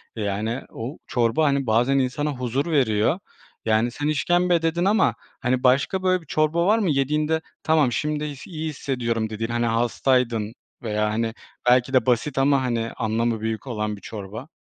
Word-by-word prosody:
Yani, 110 +3 -2
o 120 +7 -6
çorba, 120 +5 +2
hani, 140 -2 +1
bazen 120 +5 +3
insana 145 +4 -1
huzur 125 +1 -2
veriyor. 125 - +2 0.5
Yani, 110 +2 +2
sen 145 +4 -3
işkembe 175 +3 +2
dedin 170 +2 0
ama, 210 +1 +3 0.3
hani, 125 -1 0
başka 140 +9 +2
böyle 185 -1 +2
bir 160 - -19
çorba 155 +3 +1
var 210 +4 +4
mı, 200 -5 +1
yediğinde 150 +3 +1 0.2
"Tamam 155 -5 +3
şimdi 150 +2 -2
s 140 - -12
iyi 160 -1 -3
hissediyorum." 120 -6 -2
dediğin, 115 +1 -4
hani, 120 0 0
hastaydın 115 -1 +1 0.3
veya, 105 -2 0
hani, 115 0 -1 0.4
belki 125 +2 +3
de 130 - +4
basit 130 +3 +1
ama, 135 0 +3
hani, 115 -2 -1
anlamı 110 0 -1
büyük 110 +2 -3
olan 105 -3 -2
bir 100 - -14
çorba? 110 +5 -7
125 Hz, 170 wpm, -23 LUFS, 115-150 Hz, 0.5 s, var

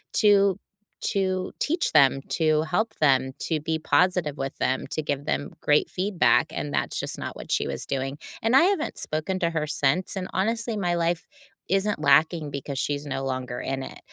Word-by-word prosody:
to 200 -2 +4 0.5
to 185 -2 -1
teach 335 +3 0
them, 135 -2 +5 0.2
to 155 -1 +3
help 205 +7 -1
them, 130 -2 +3
to 160 -2 -1
be 160 +2 -1
positive 175 -3 +2
with 135 0 -4
them, 130 +1 0
to 155 - -1
give 145 -1 -3
them 145 - -2
great 150 0 +3
feedback, 185 -3 +2
and 145 - -4
that's - - -1
just - - -3
not - - -5
what - - -9
she - - +1
was - - -4
doing. 135 +1 -2 0.3
And 230 +3 +3
I 275 - +7
haven't 370 -4 0
spoken 155 +5 -2
to 170 0 +1
her 155 -2 -1
since, 155 +6 0
and, 185 0 -3
honestly, 225 +3 0
my 175 -3 0
life 170 0 -1 0.4
isn't 195 -1 +1
lacking 155 +2 +3
because 140 -1 -4
she's 145 +1 -2
no 135 -1 -3
longer 130 -2 -3
in 135 0 -3
it. - - -9
160 Hz, 185 wpm, -25 LUFS, 140-190 Hz, 0.5 s, I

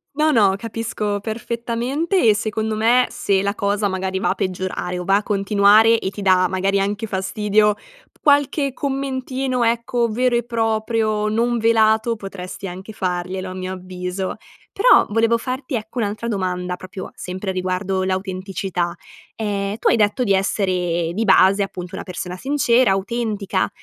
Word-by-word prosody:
No, 310 +1 +3
no 200 -6 +4
capisco 215 -2 -3
perfettamente, 235 - -2
e 215 - +6
secondo 215 +1 -2
me, 235 +3 +3
se 195 -1 0
la 200 +1 -1
cosa 205 +1 0
magari 190 0 -2
va - - 0
a - - +1
peggiorare 185 -1 -3
o 180 - -4
va 195 +2 +3
a 205 - 0
continuare 210 +2 +4
e 190 - -2
ti 205 - -8
dà 185 -2 +4
magari 195 +2 0
anche 205 +3 -2
fastidio, 210 +2 +1 0.4
qualche 285 -1 +2
commentino, 265 -2 -2
ecco, 235 +1 +1
vero 245 +3 +1
e 240 - +1
proprio, 220 -2 0
non 235 +2 +1
velato 225 0 +3
potresti 195 -1 -7
anche 190 +4 -8
farglielo 185 0 -3
a 185 - -7
mio 185 0 -4
avviso! 185 +1 -5 0.4
Però, - - +5
volevo 230 +2 +3
farti 255 +3 -4
ecco 220 +2 -4
un'altra 215 +1 -2
domanda, 180 -3 -2
proprio 185 +1 -8
sempre 185 +2 -5
riguardo 185 +1 -1
l'autenticità, 185 -2 -2 0.4
ehm, 200 -2 -2
tu - - +1
hai - - +4
detto 210 +3 +2
di 200 - +2
essere 180 -4 0
di 220 +5 -1
base 195 0 +5
appunto 185 -1 -8
una - - -6
persona 180 0 -6
sincera, 255 -3 +2
autentica 205 -1 -1
205 Hz, 155 wpm, -21 LUFS, 190-230 Hz, 0.4 s, e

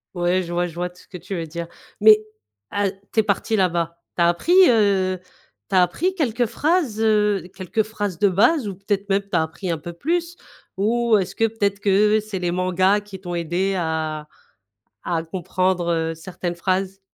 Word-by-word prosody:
Ouais, 175 +1 +1
je 170 - -7
vois 175 +1 0
je 170 - -10
vois 175 +1 -2
tout 180 +1 -19
ce - - -25
que 180 - -9
tu 185 +3 -6
veux 165 -2 -4
dire, 170 +2 -6 0.3
mais 215 0 +9 0.5
a 200 -1 0
tu 200 +3 -1
es - - -6
parti 210 +2 0
là-bas, 170 -4 0 0.2
tu 175 - +1
as 170 - +5
appris, 175 - +1 0.2
heu, 195 -5 +2 0.5
tu 195 - -1
as 185 - +6
appris 355 - 0
quelques 245 - 0
phrases, 285 -1 0
heu, 210 -4 +2
quelques 195 +4 -1
phrases 205 -4 -4
de 205 - +4
base 215 - +3
ou 195 - -5
peut-être 200 +1 -2
même, 200 0 +2
tu 200 - -26
as - - +3
appris 160 +3 -4
un 165 - -1
peu 170 +3 -8
plus 340 - -2 0.4
ou 230 +3 +2
est-ce 190 -3 -2
que 225 - +1
peut-être 205 -3 -1
que 210 +2 +3
c'est 215 -3 -5
les 175 -1 -1
mangas 185 +2 +2
qui 200 -2 -10
t'ont 175 -2 -5
aidé 175 +4 -1
à 160 -2 -2 0.8
à 165 -2 -1
comprendre 170 -1 -1
certaines 175 +1 -5
phrases? 190 +2 -1
190 Hz, 195 wpm, -22 LUFS, 175-210 Hz, 0.8 s, mais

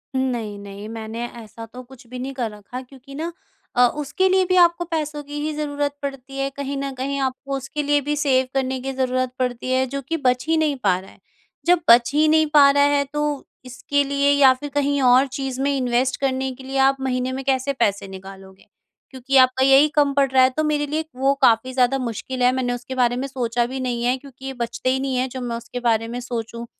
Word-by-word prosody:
नहीं, 240 -6 -2
नहीं। 200 +1 -9
मैंने 225 +1 -5
ऐसा 230 -1 -11
तो 250 +3 -11
कुछ 255 0 -16
भी 250 +1 -8
नहीं 265 +2 -5
कर 240 -4 -3
रखा 210 +5 -8
क्योंकि 270 +1 -14
ना 330 +4 -4 0.4
अ, 245 0 +6
उसके 300 +8 -1
लिए 375 0 +3
भी 370 - +3
आपको 345 0 +4
पैसों 300 -2 -2
की 290 +1 -7
ही 305 +1 -2
ज़रूरत 290 -1 -2
पड़ती 275 -1 -6
है। 275 0 -1
कहीं 275 0 -5
न 275 0 -3
कहीं 275 +2 -3
आपको 270 +1 -3
उसके 270 +3 -4
लिए 290 0 +2
भी 295 +2 -2
सेव 265 -3 +2
करने 265 -1 -1
की 270 - -3
ज़रूरत 255 -1 -1
पड़ती 250 0 -2
है, 260 0 +2
जो 275 +2 -4
कि 325 +5 -3
बच 250 -4 +1
ही 325 - +2
नहीं 310 -2 +1
पा 185 -3 +3
रहा 190 - -14
है। - - -22 0.5
जब 350 0 +4
बच 235 +3 +6
ही 305 +1 +4
नहीं 315 0 +4
पा 285 -2 +8
रहा 285 0 +3
है 285 - +2
तो 295 -1 -2 0.2
इसके 270 +3 -1
लिए 280 0 +1
या 275 -2 +6
फिर 290 +3 -8
कहीं 285 -1 +1
और 255 +2 +5
चीज़ 265 -1 -5
में 280 +1 +1
इन्वेस्ट 255 0 0
करने 265 -1 -1
के 265 - -13
लिए 270 +1 -4
आप 275 - +1
महीने 255 -1 -1
में 265 +1 -4
कैसे 270 0 0
पैसे 200 -6 0
निकालोगे? 190 0 -12 0.4
क्योंकि 265 +1 0
आपका 255 0 +5
यही 270 +2 +6
कम 290 -2 +3
पड़ 275 -1 +2
रहा 260 -1 +5
है। 255 - +5
तो 310 - +2
मेरे 300 -1 0
लिए 305 +2 -1
एक 320 - -5
वो 270 +2 +2
काफ़ी 255 0 +3
ज़्यादा 255 +1 +2
मुश्किल 250 +1 -4
है। 250 - +5
मैंने 255 -1 -1
उसके 245 +2 -6
बारे 245 -1 +2
में 265 +2 -3
सोचा 240 -3 -1
भी 260 +2 -5
नहीं 245 -2 -2
है 250 +2 +1
क्योंकि 270 0 -9
बचते 235 +2 -3
ही 260 +1 +1
नहीं 265 -1 -2
है, 255 +1 0
जो 260 0 -7
मैं 240 -1 -3
उसके 235 +1 -7
बारे 225 -2 +1
में 240 +2 -5
सोचूँ। 235 -1 -5
260 Hz, 235 wpm, -22 LUFS, 245-280 Hz, 0.5 s, पा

